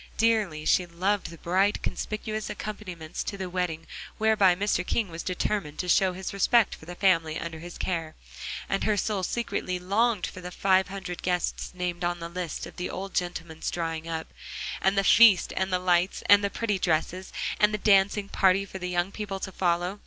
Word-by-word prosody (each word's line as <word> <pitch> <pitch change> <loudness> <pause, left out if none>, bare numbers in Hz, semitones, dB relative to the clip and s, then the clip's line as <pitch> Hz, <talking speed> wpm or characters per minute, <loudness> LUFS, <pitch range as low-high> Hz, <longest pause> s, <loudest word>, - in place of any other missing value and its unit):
Dearly 215 -9 +1
she 180 - +3
loved 190 +4 0
the 170 - -10
bright, 190 +5 +1
conspicuous 215 0 -3
accompaniments 180 -7 -6
to 200 - -5
the 185 -2 -5
wedding 175 -3 -2 0.3
whereby 215 -4 +4
Mr. 200 -1 0
King 210 +2 -1
was 165 0 -6
determined 180 -4 -2
to 180 - -3
show 185 +1 +4
his 190 +1 -5
respect 225 +3 +3
for 160 - -12
the 175 - -7
family 165 -5 +2
under 165 -1 -6
his 175 +1 -9
care. 165 -4 -3 0.5
And 195 - -1
her 210 -1 +2
soul 205 0 0
secretly 185 -2 -2
longed 200 +3 +1
for 185 - -8
the 180 - -6
five 190 +1 +2
hundred 190 -2 -6
guests 180 -1 -1
named 180 -1 -3
on 175 0 -1
a 170 - -5
list 175 -2 -4
of - - -12
the 180 - -3
old 195 +1 -6
gentleman's 165 -2 -3
drawing 165 -1 -3
up. 160 -1 -5 0.5
And 190 +1 +2
the 195 - +4
feast 205 -3 +6
and 190 0 -1
the 180 - +3
lights, 180 0 +1
and 205 0 +6
the 200 - +1
pretty 210 -2 -1
dresses, 180 +2 -1 0.3
and 210 0 +5
the 210 - -1
dancing 200 0 +3
party 195 0 +3
for 190 - -8
the 180 0 -4
young 175 +1 0
people 200 -2 -5
to 190 - -5
follow. 180 +2 0
185 Hz, 195 wpm, -27 LUFS, 175-200 Hz, 0.5 s, feast